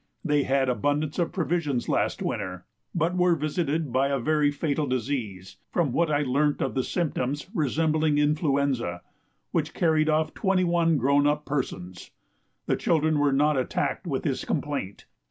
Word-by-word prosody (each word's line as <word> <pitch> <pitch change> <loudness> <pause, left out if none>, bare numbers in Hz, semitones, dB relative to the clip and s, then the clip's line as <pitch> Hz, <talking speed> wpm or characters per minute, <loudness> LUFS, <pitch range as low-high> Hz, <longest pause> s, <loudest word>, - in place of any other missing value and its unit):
They 150 -3 +3
had 135 0 +2
abundance 145 +5 0
of 170 - 0
provisions 160 -8 -1
last - - 0
winter, 90 -2 -4 0.3
but 170 +1 +1
were 180 -1 +3
visited 155 -2 -1
by 135 +2 +3
a 140 0 0
very 150 +3 +2
fatal 145 0 -1
disease 115 -7 -3
from 165 -7 +1
what 170 +5 +1
I 150 0 +1
learnt 145 +2 +1
of 130 - -1
the 130 - 0
symptoms, 145 -4 -2
resembling 155 - +1
influenza 140 - 0 0.5
which - - -1
carried 160 -2 +2
off 155 0 +1
twenty 190 -3 +1
one 170 -2 +2
grown 140 +3 +3
up 150 0 0
persons. 95 -11 -4 0.6
The - - 0
children 155 -2 +1
were 145 -1 +3
not 145 +2 +2
attacked 130 - -1
with - - -2
this - - -1
complaint. - - -3
145 Hz, 155 wpm, -26 LUFS, 135-160 Hz, 0.6 s, They